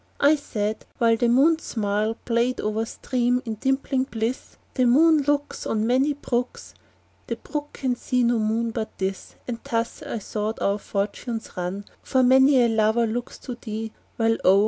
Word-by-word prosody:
I 290 +2 +5
said 215 -7 -3
(while 230 -1 +4
The 240 +1 +1
moon's 310 +7 +4
smile 215 0 -1
Played 240 +2 +1
o'er 215 +1 -1
a - - -1
stream, 245 +1 0
in 225 - -3
dimpling 270 +1 0
bliss,) 230 +3 -3 0.2
"The 255 - +2
moon 310 +5 +5
looks 290 0 -1
"On 215 0 0
many 260 +5 +2
brooks, 250 -3 -3 0.5
"The - - -2
brook 295 -1 -6
can 255 -2 -1
see 250 +1 0
no 235 -1 +2
moon 225 +2 0
but 220 -1 -5
this;" 190 0 -4
And 235 -2 -4
thus, 230 0 -2
I - - -4
thought, 215 +1 -3
our 200 +1 +1
fortunes 215 +4 -3
run, 185 +3 -4 0.2
For 260 -1 +2
many 265 +1 +6
a - - +4
lover 220 +1 +2
looks 240 +2 -4
to 255 - -4
thee, 220 -2 -6 0.3
While 225 0 +2
oh! 190 +1 +6
235 Hz, 175 wpm, -24 LUFS, 220-260 Hz, 0.5 s, many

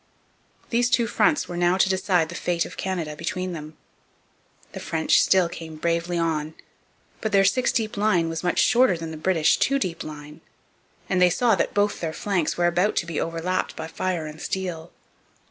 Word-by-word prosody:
These 240 +1 +2
two 245 -2 +3
fronts 300 +7 +1
were 175 - -6
now 175 +1 +2
to 190 - +4
decide 185 -3 +1
the - - -7
fate 170 0 -1
of - - -9
Canada 170 -5 -3
between 180 +3 -3
them. 155 -1 -8 0.9
The - - -7
French 160 -1 +2
still 185 -2 +4
came 165 -2 -8
bravely 170 +2 -1
on; 160 -2 -1 0.7
but 220 - -2
their 195 -1 +4
six 250 +6 +2
deep 220 -2 -2
line 200 -5 +2
was 165 +1 -4
much 180 - 0
shorter 240 -7 +4
than 165 -1 -6
the - - -6
British 160 0 +2
two 275 - +2
deep 185 -10 -3
line, 150 -1 -10 0.7
and 185 -1 +1
they 180 - +6
saw 230 +6 +2
that 195 - -1
both 205 0 +1
their 160 -2 -3
flanks 185 -5 -1
were 175 - +2
about 175 +4 +2
to 170 - 0
be 170 -3 -3
over 165 0 -3
lapped 185 +1 -1
by 160 - -5
fire 175 0 -3
and 155 +1 -9
steel. 175 -4 -4
175 Hz, 195 wpm, -24 LUFS, 165-190 Hz, 0.9 s, they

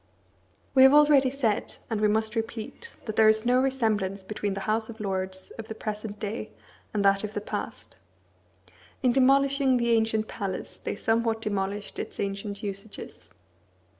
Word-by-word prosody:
We 265 - +6
have 265 +2 +8
already 295 -3 +6
said, 250 -6 -1
and 220 -2 -2
we 210 - +5
must 220 +1 0
repeat, 225 - -4 0.2
that 215 -2 -5
there 220 -1 +7
is 220 +1 +3
no 250 +1 +4
resemblance 215 -7 0
between 205 0 -3
the 195 - -4
House 220 +1 0
of 225 0 -9
Lords 190 -2 -3
of 220 - -6
the 220 - -6
present 210 -1 -5
day 215 +1 -4 0.4
and 205 -2 0
that 195 +1 +4
of 215 0 -5
the - - 0
past. 205 - -6 1.1
In 250 - +5
demolishing 270 +1 +4
the 235 -1 +1
ancient 220 -1 +2
palace 195 -4 -5
they - - -2
somewhat 225 +1 +1
demolished 200 0 -3
its - - -6
ancient 200 +1 -4
usages. 200 +1 -7
220 Hz, 165 wpm, -27 LUFS, 205-240 Hz, 1.1 s, have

